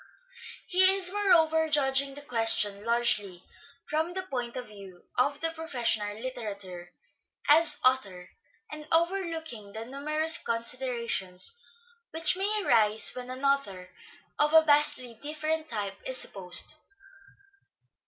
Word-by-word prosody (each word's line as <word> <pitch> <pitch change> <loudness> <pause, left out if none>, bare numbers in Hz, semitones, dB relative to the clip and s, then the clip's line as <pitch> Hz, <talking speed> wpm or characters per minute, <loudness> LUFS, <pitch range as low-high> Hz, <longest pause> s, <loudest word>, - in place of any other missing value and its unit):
He 370 +1 +2
is, 375 -1 +2
moreover, 320 -6 +3
judging 275 -2 +2
the 290 - -9
question 225 -5 +3
largely 215 -6 0 0.4
from 315 +3 -2
the 375 0 -3
point 245 -8 -5
of 250 - -4
view 195 -4 -13
of 285 +3 0
the 325 0 +1
professional 235 -10 -2
litterateur 205 -8 -7 0.6
as 300 0 +4
author, 195 -9 0 0.4
and 300 0 -8
overlooking 325 - -2
the 220 +1 -6
numerous 305 +5 -1
considerations 235 - -1 0.5
which 325 +2 +1
may 410 +2 -1
arise 215 -1 +4
when 250 0 -8
an 260 +2 -6
author 200 -10 -1 0.5
of 300 +1 +2
a 320 - +8
vastly 290 -6 +2
different 310 +1 -3
type 200 -5 -4
is 260 -1 -4
supposed. 185 +1 -1
260 Hz, 120 wpm, -28 LUFS, 215-315 Hz, 0.6 s, a